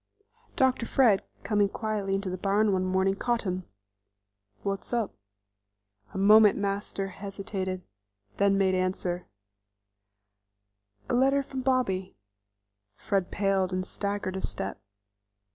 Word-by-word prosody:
Dr. 260 -5 +2
Fred, 230 -8 +4 0.2
coming 205 -2 +2
quietly 210 -3 -2
into 195 -1 -2
the 185 - -3
barn 205 +2 +2
one 185 0 +1
morning, 190 +1 +2
caught 240 +3 -1
him. 185 -2 -3 1.0
"What's 195 +3 -3
up?" 230 -4 0 1.0
A - - -7
moment 210 +1 +7
Master 200 -1 -2
hesitated, 190 -1 -5 0.5
then 200 -1 +3
made 190 -1 +3
answer: 185 -1 -1 1.8
"A - - -2
letter 270 +3 +3
from 265 -1 -5
Bobby." 245 -8 0 0.8
Fred 195 - -1
paled 195 -2 +1
and 185 0 -1
staggered 200 -2 -2
a 190 - -3
step. 95 0 -3
195 Hz, 115 wpm, -28 LUFS, 190-215 Hz, 1.8 s, moment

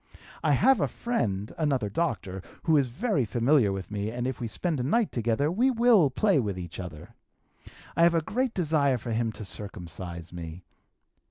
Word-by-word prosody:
I 150 - +3
have 250 - +4
a - - +2
friend 105 - -2
(another 135 -8 +1
doctor) 100 - -2 0.2
who 160 - +3
is 140 -3 +3
very 165 - 0
familiar 120 +1 +3
with 95 -1 -5
me 105 0 -2
and 120 +2 -3
if 130 0 -3
we 120 - -2
spend 155 - -2
a - - -1
night 225 - +1
together 120 +5 0
we 240 +9 +3
will 230 - +5
play 185 +5 +2
with 100 -6 -2
each 85 -1 -7
other. 80 -5 -8 0.8
I - - +2
have 170 0 +5
a 165 - +3
great 250 +6 -1
desire 150 -6 +2
for 120 +1 -6
him 115 0 0
to 110 - -8
circumcize 85 -4 -7
me. 85 0 -7
125 Hz, 185 wpm, -27 LUFS, 100-165 Hz, 0.8 s, will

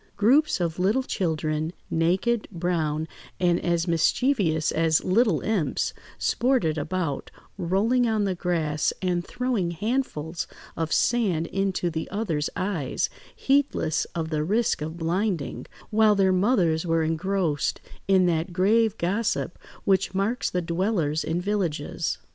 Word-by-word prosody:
Groups 260 +9 +4
of 170 -1 -2
little 210 +8 +2
children, 160 - -1 0.2
naked, 185 +8 +1
brown, 165 -4 -1 0.3
and 175 -1 +2
as 170 0 +1
mischievous 165 - +2
as 160 -1 +2
little 195 - +2
imps, 205 -8 0 0.2
sported 240 - +1
about, 160 -1 -2 0.3
rolling 205 +7 +1
on 220 -2 +1
the 195 -2 0
grass 165 -4 0
and 175 -1 0
throwing 245 -5 -1
handfuls 175 - -2 0.3
of 165 -1 -2
sand 200 -9 +2
into 190 -1 -1
the 160 0 -4
other's 175 -8 -1
eyes, 180 -9 -1 0.2
heedless 270 - +1
of 160 -2 -2
the 150 -1 0
risk 210 +2 +1
of 160 +2 -4
blinding, 175 -1 -2 0.2
while 215 -1 +5
their 190 -1 +3
mothers 180 -5 +2
were 165 -2 +1
engrossed 165 -1 0 0.3
in 190 -2 +4
that 170 0 0
grave 210 +5 +2
gossip 195 +1 -1 0.2
which 195 -1 +1
marks 210 +6 0
the 180 -1 -1
dwellers 170 -3 0
in 165 +2 -1
villages. 180 -6 -2
180 Hz, 130 wpm, -25 LUFS, 160-210 Hz, 0.3 s, while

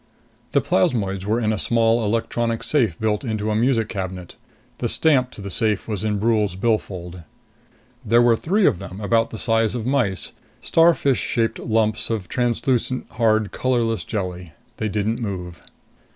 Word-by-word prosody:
The - - +4
plasmoids 95 -2 0
were 110 +3 +1
in 110 -2 +1
a 105 - -3
small 115 +1 +2
electronic 115 +1 -1
safe 115 - +1
built 110 0 0
into 110 -3 -2
a - - 0
music 115 -1 +2
cabinet. 95 -4 -6 0.4
The - - -1
stamp 135 -5 +2
to 105 - -11
the 100 0 -6
safe 105 +1 0
was 105 -3 -3
in 105 -1 0
Brule's 105 -3 +1
billfold. 95 -5 -2 0.8
There 115 +1 +4
were 120 -1 +5
three 190 - +1
of 90 - +3
them, 95 - -8
about 115 +2 +1
the 110 - -7
size 115 0 +1
of 115 -3 -3
mice, 120 - 0 0.3
starfish 165 -5 +3
shaped 115 -1 -1
lumps 110 -2 0
of 110 -5 -2
translucent, 125 +1 -1
hard, 110 -2 +1
colorless 120 -3 0
jelly. 90 -6 -5 0.2
They 110 - -2
didn't 110 +3 -1
move. 90 -5 -5
110 Hz, 160 wpm, -22 LUFS, 100-120 Hz, 0.8 s, were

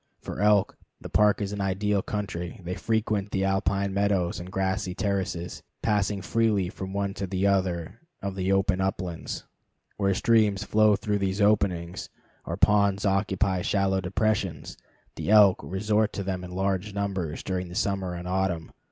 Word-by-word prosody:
For - - -6
elk, 105 -1 +3 0.2
the - - -8
park 105 -1 +3
is 100 - -3
an 100 -1 -3
ideal 100 +1 0
country. 95 -2 -4
They 90 +1 -3
frequent 105 0 -1
the 95 -1 -1
alpine 95 0 0
meadows 100 -3 +1
and 90 +1 -8
grassy 95 -1 -1
terraces, 95 -4 -2 0.2
passing 100 -2 +1
freely 105 -4 +1
from 95 -1 -7
one 100 0 -1
to 95 0 -4
the 95 +1 -1
other 95 -1 0 0.2
of 100 -1 -4
the 95 0 -1
open 95 -1 +2
uplands. 90 -3 -3 0.5
Where 100 -2 +1
streams 105 -2 +3
flow 110 0 +4
through 105 0 -1
these 95 0 -1
openings, 95 -4 +1 0.4
or - - -3
ponds 100 -1 +3
occupy 95 -1 +1
shallow 95 0 +1
depressions, 95 -4 -1 0.4
the - - -3
elk 105 -3 +7
resort 105 +3 0
to 100 - -3
them 95 -1 -3
in 90 - -7
large 95 +2 -2
numbers 95 -6 -2
during 90 -2 -3
summer 95 -3 -1
and 90 +1 -6
autumn. 90 -3 -1
95 Hz, 160 wpm, -27 LUFS, 95-100 Hz, 0.5 s, elk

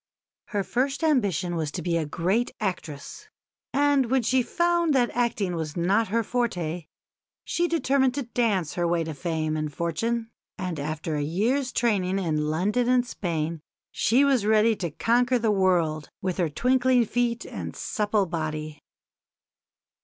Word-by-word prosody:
Her 205 -3 -2
first 260 - -1
ambition 195 - +1
was 160 -2 -1
to 175 - -4
be 170 0 0
a 160 -3 0
great 185 +10 0
actress; 175 -8 -5 0.4
and 280 -2 +3
when 260 -1 +2
she 255 +3 +3
found 345 +2 +1
that 245 -2 +2
acting 230 -6 0
was 160 -1 -4
not 195 +6 +2
her 230 +4 0
forte 180 -9 -2 0.6
she 345 0 0
determined 270 -6 +2
to 285 - -1
dance 220 -9 0
her 175 -1 0
way 170 -1 +1
to 160 -1 -5
fame 155 0 -2
and 155 -1 -2
fortune, 225 +9 -2 0.3
and 180 -6 -4
after 155 +2 -3
a - - -1
year's 230 - 0
training 195 -5 +1
in 155 -5 0
London 210 +10 +1
and 250 -1 +3
Spain 165 -7 -3 0.3
she 255 +6 +3
was 270 -6 +3
ready 220 +1 +4
to 175 -4 -2
conquer 245 - +2
the 225 -2 +1
world 175 -6 +1
with 185 -2 -2
her 175 -4 +1
twinkling 250 - +3
feet 235 +1 -1
and - - -6
supple 210 -1 0
body. 155 -3 -4
200 Hz, 155 wpm, -26 LUFS, 165-245 Hz, 0.6 s, ready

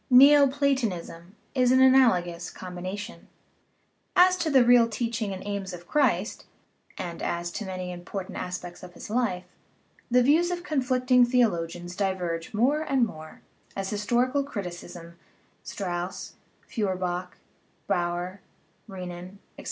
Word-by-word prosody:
Neoplatonism 260 - +4 0.2
is 250 -2 +3
an 260 - +5
analogous 205 -11 +4
combination. 185 +4 -7 0.9
As 365 +1 +6
to 340 -3 -1
the 265 -4 +6
real 240 -1 +6
teaching 230 -2 -2
and 190 0 -7
aims 200 -2 -4
of 175 -1 -10
Christ 225 -9 +1 0.5
(and 175 -2 -6
as 175 0 -2
to 210 - -5
many 185 -1 -5
important 180 +2 -7
aspects 180 -1 -6
of 180 -1 -12
his - - -9
life) 215 -7 0 0.7
the 250 0 +4
views 320 +7 +4
of 350 -1 -3
con 300 -6 0
flicting 255 0 +3
theologians 175 -8 0
diverge 180 -4 -2
more 260 +8 +2
and 270 -5 +2
more, 155 -7 -10 0.3
as 195 -1 -3
histori 240 +5 +1
cal 285 - +2
criticism 175 -7 -8 0.4
(Strauss, 180 -1 -5 0.3
Feuerbach, 185 -4 -3 0.5
Baur, 175 +2 -2 0.5
Renan, 180 -1 -8 0.2
etc.) - - -14
200 Hz, 130 wpm, -26 LUFS, 175-250 Hz, 0.9 s, As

